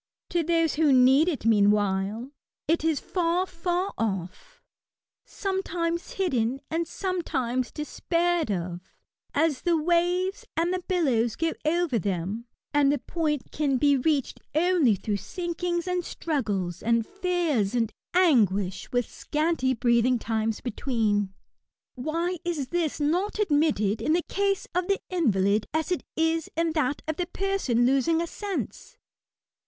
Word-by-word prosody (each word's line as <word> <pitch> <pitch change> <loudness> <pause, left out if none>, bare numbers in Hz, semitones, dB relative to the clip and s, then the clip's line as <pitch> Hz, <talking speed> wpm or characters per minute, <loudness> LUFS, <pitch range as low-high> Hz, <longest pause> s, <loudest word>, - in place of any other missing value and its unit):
To 345 - +2
those 330 -1 +2
who 310 -2 +4
need 265 +4 +6
it, 290 -9 -4
meanwhile, 205 +2 +2 0.4
it 330 0 +2
is 320 -3 +1
far 355 0 0
far 355 +2 -2
off— 205 - -4 0.7
sometimes 350 -3 -2
hidden 260 -9 0
and 330 +1 0
sometimes 260 -10 -2
despaired 335 0 0
of, 175 -2 -3 0.5
as 295 -2 +2
the 345 -2 +2
waves 355 +4 +1
and 340 +2 +1
the 370 - -1
billows 255 - +1
go 330 0 0
over 320 -6 +1
them, 195 +4 -3 0.3
and 285 -1 +4
the 290 - +1
point 300 -6 -2
can 280 -3 +1
be 285 +2 +4
reached 275 0 0 0.2
only 325 - +4
through 205 +2 -2
sinkings 345 - -3
and 360 -1 0
struggles, 205 - -2
and 230 0 +2
fears 345 - 0
and 230 -2 0 0.2
anguish, 205 - +2
with 245 -2 +1
scanty 300 -4 0
breathing 240 +1 +3
times 220 -1 -2
between. 215 -5 0 0.6
Why 330 +7 -2
is 315 -7 -2
this 340 -4 -1
not 350 +9 0
admitted 290 - +2
in 310 - +2
the 345 0 +1
case 395 0 0
of 360 0 0
the 395 - +1
invalid 210 - +2
as 320 +3 0
it 360 - 0
is 325 0 +1
in 330 0 +2
that 295 -3 -1
of 315 -1 -2
the 355 - -1
person 370 -12 0
losing 275 +6 +3
a 340 - 0
sense 410 +6 -5
305 Hz, 140 wpm, -26 LUFS, 235-345 Hz, 0.7 s, need